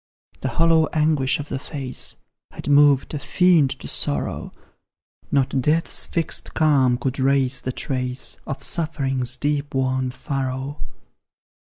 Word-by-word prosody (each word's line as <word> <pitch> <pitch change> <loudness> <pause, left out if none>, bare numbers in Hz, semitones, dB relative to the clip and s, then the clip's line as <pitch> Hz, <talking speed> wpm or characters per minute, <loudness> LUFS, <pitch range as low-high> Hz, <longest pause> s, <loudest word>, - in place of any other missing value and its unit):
The - - -3
hollow 165 -1 +4
anguish 150 -4 +2
of 145 - -5
the - - -3
face 135 -3 -5 0.3
Had - - -9
moved 145 -1 +4
a 150 - -2
fiend 170 -2 +3
to - - -5
sorrow; 70 -2 -1 0.8
Not 135 -1 +1
death's 155 +5 +1
fixed 165 -2 -1
calm 135 -6 +3
could 130 +2 -3
rase 130 -1 +2
the 130 - -3
trace 125 -1 -2
Of 135 - -5
suffering's 135 -6 -1
deep 145 0 -1
worn 130 -1 0
furrow. 135 +2 -4
135 Hz, 130 wpm, -22 LUFS, 130-150 Hz, 0.8 s, hollow